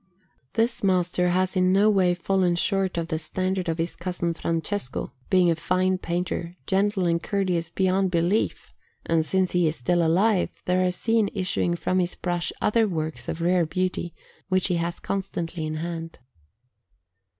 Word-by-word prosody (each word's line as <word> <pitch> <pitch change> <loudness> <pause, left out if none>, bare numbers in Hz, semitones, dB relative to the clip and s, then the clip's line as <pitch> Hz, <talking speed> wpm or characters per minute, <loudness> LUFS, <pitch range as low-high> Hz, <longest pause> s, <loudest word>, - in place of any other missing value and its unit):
This 230 0 0
master 180 -1 +2
has 185 +2 +1
in 185 0 +3
no 200 +3 +4
way 185 -4 +3
fallen 180 0 +1
short 190 0 0
of 165 0 -2
the 160 -2 -1
standard 185 +2 -2
of 165 - -1
his 165 +1 -2
cousin 175 -1 -2
Francesco, 165 -5 -3 0.2
being 180 -2 +4
a - - +1
fine 185 +3 +1
painter, 175 0 -3
gentle 195 0 +1
and 170 -1 +1
courteous 180 -5 -1
beyond 190 0 +1
belief; 180 +5 0 0.3
and 165 -1 +2
since 185 +3 0
he 175 -2 +3
is 155 - -1
still 170 +7 +1
alive, 185 +4 +3 0.2
there 180 0 +2
are 180 - +2
seen 220 +3 +1
issuing 185 -2 0
from 185 +2 0
his 180 -1 0
brush 175 -1 -2
other 225 +1 +3
works 155 -8 -3
of 165 - -4
rare 175 -1 +2
beauty, 185 0 -2 0.3
which 185 0 +2
he 175 - +1
has 170 +1 -2
constantly 170 -4 -3
in 155 - -3
hand. 165 0 -5
180 Hz, 165 wpm, -25 LUFS, 170-190 Hz, 0.3 s, no